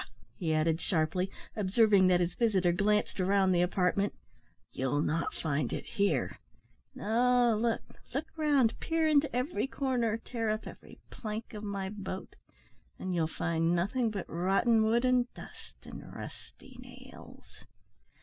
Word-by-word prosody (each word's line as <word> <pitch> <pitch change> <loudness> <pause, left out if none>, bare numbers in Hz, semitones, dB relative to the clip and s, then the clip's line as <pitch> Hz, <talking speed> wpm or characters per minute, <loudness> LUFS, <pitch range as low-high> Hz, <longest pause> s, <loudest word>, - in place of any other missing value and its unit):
he 165 -5 -2
added, 160 +1 +1
sharply, 180 +1 0 0.3
observing 205 -1 +4
that 180 -1 +4
his 175 0 0
visitor 195 -7 +2
glanced 205 +3 +1
round 190 0 +3
the 175 - +3
apartment, 185 +2 +1 0.6
"you'll 135 +2 -1
not 165 +2 -1
find 150 -2 -1
it - - -4
here. 200 - 0 0.6
No, 240 +2 +3
look, 230 +1 0 0.3
look 275 +5 -2
round, 290 -7 +2
peer 325 -1 +1
into 300 -1 +4
every 255 +3 -1
corner, 250 -5 0
tear 230 -1 -3
up 215 +1 -2
every - - -11
plank 220 0 -6
of 210 0 -7
my 200 -2 -3
boat, 190 -2 -7 0.6
and 185 - -4
you'll 165 -2 +1
find 165 +1 0
nothing 220 +7 0
but 200 -4 -4
rotten 195 +6 +2
wood, 230 +3 +2
and 250 -1 +2
dust, - - -12
and - - -9
rusty 260 -2 -11
nails." 255 +1 -14
210 Hz, 140 wpm, -31 LUFS, 180-240 Hz, 0.6 s, observing